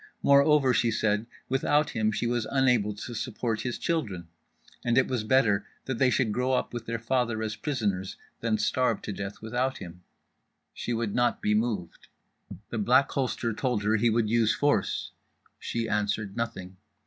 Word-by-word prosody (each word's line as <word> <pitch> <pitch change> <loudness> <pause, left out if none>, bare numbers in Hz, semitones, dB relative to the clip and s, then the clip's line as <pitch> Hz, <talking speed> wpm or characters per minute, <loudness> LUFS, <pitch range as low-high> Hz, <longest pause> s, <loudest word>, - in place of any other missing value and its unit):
Moreover, 140 -1 +5
she 120 0 +2
said, 110 0 0 0.2
without 145 +3 +1
him 110 -1 +1
she 105 +3 -2
was 120 -1 0
unable 125 -6 +2
to 115 +3 -7
support 110 0 -2
his 125 -2 -3
children! 100 - -2 0.5
and 120 -1 +1
it 130 - +4
was 125 -4 -1
better 110 -4 +2 0.2
that 130 -3 -3
they 130 - +5
should 125 -3 +1
grow 125 +4 0
up 125 - -1
with 120 -1 -6
their 115 0 -1
father 115 -1 0
as 110 -1 -3
prisoners 105 -10 -2 0.2
than 115 -2 0
starve 125 0 +1
to 105 - -4
death 100 +2 -6
without 125 +4 -1
him. 90 0 -10 0.7
She - - -4
would 115 -3 -1
not 120 -1 +1
be 105 - +1
moved. 105 -6 -2 0.6
The 115 - -2
Black 125 +6 +4
Holster 125 -3 -1
told 120 -2 -1
her 110 +2 +2
he 115 +2 +3
would 115 0 +1
use 115 0 +2
force—she 120 -4 -2
answered 105 -1 -1
nothing. 95 -6 -4
115 Hz, 170 wpm, -28 LUFS, 105-125 Hz, 0.7 s, Moreover